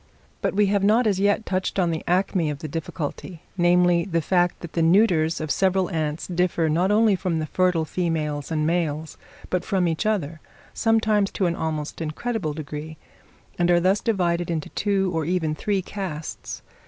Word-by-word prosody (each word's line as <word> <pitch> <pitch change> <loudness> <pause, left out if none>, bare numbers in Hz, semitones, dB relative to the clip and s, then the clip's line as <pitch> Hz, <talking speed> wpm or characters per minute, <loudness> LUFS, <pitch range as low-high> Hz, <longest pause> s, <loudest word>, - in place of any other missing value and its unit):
But - - -1
we 210 0 +4
have 200 0 +1
not 220 +4 +4
as 200 -3 +1
yet 205 +2 +2
touched 185 0 -2
on 175 -3 +2
the 160 - -3
acme 180 -2 +1
of 145 - -3
the 155 - -6
difficulty; 165 +2 -5
namely, 175 -1 +4
the 170 -3 -1
fact 175 +2 +1
that 170 - -8
the 170 - 0
neuters 165 -2 +3
of 155 -2 -3
several 190 -1 +1
ants 155 -1 -2
differ, 175 -2 0
not 175 +5 +2
only 210 0 +4
from 180 -2 -1
the 155 - -1
fertile 180 0 +1
females 155 -4 -2
and 155 -2 0
males, 160 -2 -1 0.4
but 180 -1 0
from 185 -3 +1
each 165 +6 -1
other, 165 -7 -1 0.3
sometimes 220 -3 +2
to 190 - 0
an 170 -1 0
almost 155 -1 -4
incredible 165 +1 -3
degree, 155 +1 -7 0.6
and 175 0 +2
are 175 0 +5
thus 190 +4 +2
divided 175 -5 0
into 160 -3 -2
two 195 -2 0
or 160 -1 0
even 165 -1 0
three 195 +4 -1
castes. 175 -6 -6
175 Hz, 180 wpm, -24 LUFS, 160-195 Hz, 0.6 s, are